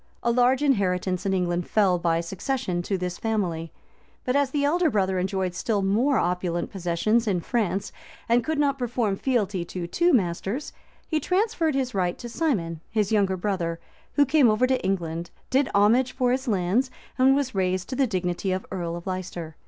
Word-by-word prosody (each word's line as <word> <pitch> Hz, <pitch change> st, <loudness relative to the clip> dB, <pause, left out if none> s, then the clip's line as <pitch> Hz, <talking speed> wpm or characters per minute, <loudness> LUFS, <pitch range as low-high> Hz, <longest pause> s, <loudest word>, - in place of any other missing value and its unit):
A 235 Hz, -, +2 dB
large 250 Hz, +3 st, +3 dB
inheritance 185 Hz, -8 st, +1 dB
in 195 Hz, -, +1 dB
England 175 Hz, -1 st, -1 dB
fell 190 Hz, -5 st, +3 dB
by 170 Hz, -1 st, +1 dB
succession 185 Hz, +1 st, -2 dB
to 195 Hz, +2 st, -2 dB
this 180 Hz, -1 st, -4 dB
family; 180 Hz, -8 st, -2 dB, 0.5 s
but 250 Hz, -, 0 dB
as 285 Hz, -2 st, +3 dB
the 285 Hz, +1 st, 0 dB
elder 335 Hz, +3 st, +3 dB
brother 190 Hz, -5 st, +1 dB
enjoyed 190 Hz, -1 st, -1 dB
still 205 Hz, +1 st, -1 dB
more 235 Hz, +9 st, +2 dB
opulent 175 Hz, -1 st, -1 dB
possessions 195 Hz, +6 st, 0 dB
in 190 Hz, -4 st, +1 dB
France, 200 Hz, 0 st, -1 dB, 0.4 s
and 235 Hz, +1 st, +3 dB
could 315 Hz, -1 st, -2 dB
not 280 Hz, -2 st, +1 dB
perform 235 Hz, -4 st, 0 dB
fealty 205 Hz, -6 st, 0 dB
to 175 Hz, 0 st, -5 dB
two 345 Hz, -, +2 dB
masters, 205 Hz, -, -1 dB, 0.3 s
he 315 Hz, -, 0 dB
transferred 360 Hz, -3 st, 0 dB
his 260 Hz, -2 st, -1 dB
right 180 Hz, -2 st, 0 dB
to 240 Hz, -, -7 dB
Simon, 195 Hz, -, -1 dB
his 215 Hz, -2 st, 0 dB
younger 195 Hz, -3 st, +2 dB
brother, 175 Hz, -4 st, -2 dB, 0.3 s
who 290 Hz, -, +4 dB
came 275 Hz, -2 st, +4 dB
over 215 Hz, +4 st, +3 dB
to 260 Hz, 0 st, 0 dB
England, 170 Hz, -3 st, -2 dB, 0.2 s
did 270 Hz, +1 st, +2 dB
homage 235 Hz, +6 st, +4 dB
for 250 Hz, -2 st, +1 dB
his 260 Hz, +1 st, -1 dB
lands, 205 Hz, +5 st, +1 dB, 0.3 s
and 265 Hz, +1 st, +6 dB
was 275 Hz, -3 st, -1 dB
raised 185 Hz, -1 st, 0 dB
to 260 Hz, -, -3 dB
the 270 Hz, 0 st, +2 dB
dignity 185 Hz, -2 st, -2 dB
of 185 Hz, +1 st, -2 dB
earl 170 Hz, -2 st, -3 dB
of 170 Hz, -, -8 dB
Leicester. 180 Hz, -4 st, -5 dB
200 Hz, 185 wpm, -25 LUFS, 180-255 Hz, 0.5 s, and